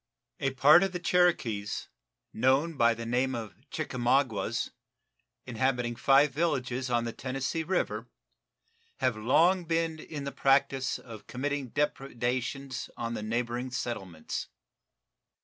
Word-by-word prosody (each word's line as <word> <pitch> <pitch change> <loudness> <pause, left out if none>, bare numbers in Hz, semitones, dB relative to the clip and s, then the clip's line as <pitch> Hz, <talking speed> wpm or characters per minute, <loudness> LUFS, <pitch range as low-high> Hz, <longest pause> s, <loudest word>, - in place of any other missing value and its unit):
A 135 - +1
part 145 +7 +7
of 195 -1 0
the 180 - -2
Cherokees, 150 - +1 0.5
known 135 +7 +2
by 115 -3 +4
the 115 0 -6
name 125 +3 +1
of 110 -4 -5 0.2
Chickamaugas, 130 -5 0 0.7
inhabiting 125 -1 0
five 135 +5 +5
villages 135 -4 -1
on 120 -1 +2
the 115 -1 -4
Tennessee 135 +6 -2
River, 185 +4 -1 0.9
have 130 -3 +1
long 165 - +3
been 165 -1 0
in 150 -2 -6
the 140 - -4
practice 135 -1 +2
of 115 -3 -11
committing 140 +1 -2
depredations 130 0 -2
on 115 0 -3
the 115 - -4
neighboring 120 +3 -2
settlements. 95 -10 -4
130 Hz, 120 wpm, -29 LUFS, 120-145 Hz, 0.9 s, part